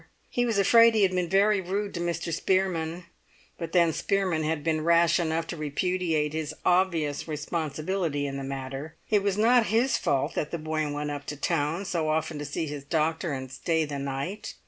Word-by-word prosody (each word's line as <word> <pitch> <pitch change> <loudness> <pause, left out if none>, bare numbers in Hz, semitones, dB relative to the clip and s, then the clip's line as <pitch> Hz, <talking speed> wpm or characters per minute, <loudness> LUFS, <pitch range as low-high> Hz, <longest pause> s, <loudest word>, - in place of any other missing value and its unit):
He 245 0 +1
was 225 -3 0
afraid 230 +3 +6
he 215 - +4
had 190 - +4
been 180 -2 0
very 200 +1 +3
rude 200 +3 -3
to 170 - -4
Mr. 170 -1 -2
Spearman; 175 -2 0 0.5
but 165 -1 -5
then 170 -2 +4
Spearman 190 -4 0
had 155 -1 -1
been 160 -1 0
rash 170 +1 +4
enough 165 -1 0
to 170 - -5
repudiate 155 0 -1
his 155 -2 -3
obvious 170 -6 +1
responsibility 155 0 -2
in 140 -1 -4
the 135 - -5
matter. 135 +2 -6 0.2
It 210 -2 +4
was 200 0 0
not 235 +1 +4
his 235 +4 +2
fault 135 -2 0
that 150 - -2
the 170 - -3
boy 155 -1 -2
went 145 0 -3
up 145 -1 -6
to 145 - -4
town 165 +4 -1
so 165 -5 -1
often 155 0 -1
to 145 - -4
see 145 +3 -3
his 145 -2 -6
doctor 160 +3 0
and 130 -2 -5
stay 160 +4 0
the 145 -1 -5
night. 140 +9 -4
165 Hz, 195 wpm, -27 LUFS, 150-185 Hz, 0.5 s, afraid